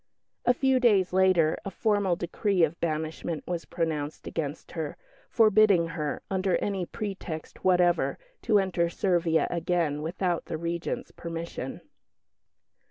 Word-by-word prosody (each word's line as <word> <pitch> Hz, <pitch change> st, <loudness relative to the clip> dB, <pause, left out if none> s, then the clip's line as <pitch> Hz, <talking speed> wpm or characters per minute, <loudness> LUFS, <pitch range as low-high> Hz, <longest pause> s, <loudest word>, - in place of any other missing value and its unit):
A 245 Hz, -, +5 dB
few 265 Hz, 0 st, +3 dB
days 200 Hz, -7 st, +3 dB
later 185 Hz, -4 st, +4 dB
a -, -, -4 dB
formal 205 Hz, -2 st, +1 dB
decree 180 Hz, +2 st, 0 dB
of 160 Hz, +1 st, +1 dB
banishment 160 Hz, 0 st, -2 dB
was 175 Hz, -2 st, -3 dB
pronounced 155 Hz, -3 st, -3 dB
against 150 Hz, -2 st, -4 dB
her, 160 Hz, -4 st, -4 dB, 0.3 s
forbidding 215 Hz, -6 st, +5 dB
her, 150 Hz, -3 st, -3 dB
under 190 Hz, -1 st, +1 dB
any 195 Hz, -4 st, -2 dB
pretext 190 Hz, -6 st, -6 dB
whatever, 180 Hz, -1 st, +3 dB, 0.2 s
to 220 Hz, -3 st, +3 dB
enter 180 Hz, -3 st, +1 dB
Servia 170 Hz, -3 st, +1 dB
again 170 Hz, -4 st, 0 dB
without 175 Hz, +2 st, -1 dB
the 160 Hz, -, -4 dB
Regent's 170 Hz, +1 st, -3 dB
permission. 165 Hz, -5 st, -6 dB
175 Hz, 125 wpm, -28 LUFS, 165-195 Hz, 0.3 s, A